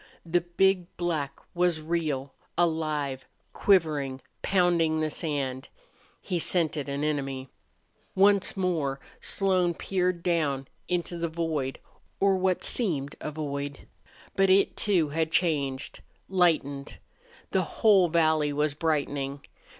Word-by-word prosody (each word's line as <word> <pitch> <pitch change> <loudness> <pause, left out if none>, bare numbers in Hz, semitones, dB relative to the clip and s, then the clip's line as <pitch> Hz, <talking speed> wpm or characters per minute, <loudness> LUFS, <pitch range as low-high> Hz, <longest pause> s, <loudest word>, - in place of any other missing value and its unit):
The 175 +1 +2
big 180 +1 +2
black 155 -5 -2
was 175 -2 +1
real, 155 -4 -2 0.2
alive, 155 -5 0 0.3
quivering, 150 -9 +2 0.2
pounding 175 -4 +2
the 155 -1 0
sand. 140 -5 -3 0.5
He 180 -3 -2
scented 155 -4 +1
an 140 +1 -2
enemy. 135 -3 -2 0.7
Once 200 0 +4
more 160 -8 0 0.2
Slone 185 -3 +1
peered 180 -2 -1
down 145 -6 0 0.2
into 175 -1 -2
the 170 0 -1
void 160 -5 -2 0.4
or 195 0 +4
what 185 -1 +1
seemed 155 - -1
a - - -3
void. 145 -2 -5 0.5
But 195 0 +3
it, 195 +1 +4
too, 180 -7 +1
had 160 +2 -1
changed, 145 -6 0 0.3
lightened. 155 -7 +1 0.5
The - - +3
whole 200 -5 +4
valley 155 -2 +3
was 150 0 0
brightening. 145 -3 -1
160 Hz, 115 wpm, -27 LUFS, 145-180 Hz, 0.7 s, Once